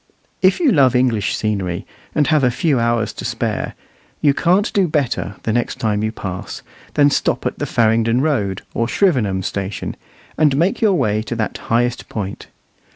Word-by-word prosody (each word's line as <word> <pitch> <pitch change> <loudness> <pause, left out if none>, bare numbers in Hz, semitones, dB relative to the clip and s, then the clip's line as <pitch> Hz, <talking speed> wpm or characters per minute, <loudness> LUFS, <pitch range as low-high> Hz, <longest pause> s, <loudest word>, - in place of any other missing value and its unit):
If 185 0 +4
you 315 -7 +4
love 135 - +4
English 120 -5 +1
scenery, 95 -5 -2 0.3
and 150 - +3
have 155 -2 +2
a 125 - +5
few 135 +2 +1
hours 115 -1 0
to - - -8
spare, - - -2 0.4
you 145 -2 +4
can't 180 +7 +2
do 195 -3 +3
better, 140 -9 -1
the 110 - 0
next 120 0 -1
time 105 -2 0
you 110 - 0
pass, 95 -4 -6 0.3
than 145 0 +5
stop - - 0
at - - -2
the - - -2
Farringdon 115 +1 +2
Road 110 -11 0
or 115 - 0
Shrivenham 120 - +1
station, 100 +1 -4 0.4
and 150 -3 +4
make 185 - +1
your 210 -4 +4
way 105 -8 +1
to 115 +2 -5
that 110 -2 -2
highest 120 +1 -1
point. 100 -3 -5
120 Hz, 175 wpm, -19 LUFS, 110-150 Hz, 0.4 s, a